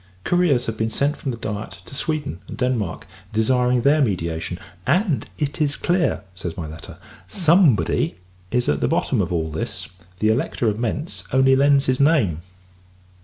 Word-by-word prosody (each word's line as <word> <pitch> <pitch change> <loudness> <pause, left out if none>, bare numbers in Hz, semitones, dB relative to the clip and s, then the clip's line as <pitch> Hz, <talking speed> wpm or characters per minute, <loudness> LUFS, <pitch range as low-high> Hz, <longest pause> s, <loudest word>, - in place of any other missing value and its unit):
Couriers 175 -9 +2
have 110 -1 -4
been 110 0 +1
sent 140 +6 0
from 140 - -5
the 120 - -3
Diet 105 -2 -5
to - - -11
Sweden 145 - -2
and - - -8
Denmark, 120 -10 -1 0.3
desiring 125 +2 +2
their 145 +3 +4
mediation: 90 - -1 0.3
"and 165 - +1
it 150 +1 -2
is 145 -1 +2
clear," 175 - 0
says 90 -2 -6
my 85 - -4
letter, 80 0 -9 0.3
"Somebody 165 - +3 0.3
is 125 +2 0
at 75 - +1
the - - +1
bottom - - +1
of 90 -1 -2
all 80 -2 -1
this; 80 - -5 0.3
the 110 +3 +2
Elector 115 +1 0
of 105 0 0
Mentz 135 +8 -3
only 130 0 +5
lends 140 0 +4
his 130 0 +1
name." 140 - +3
125 Hz, 170 wpm, -22 LUFS, 100-145 Hz, 0.3 s, only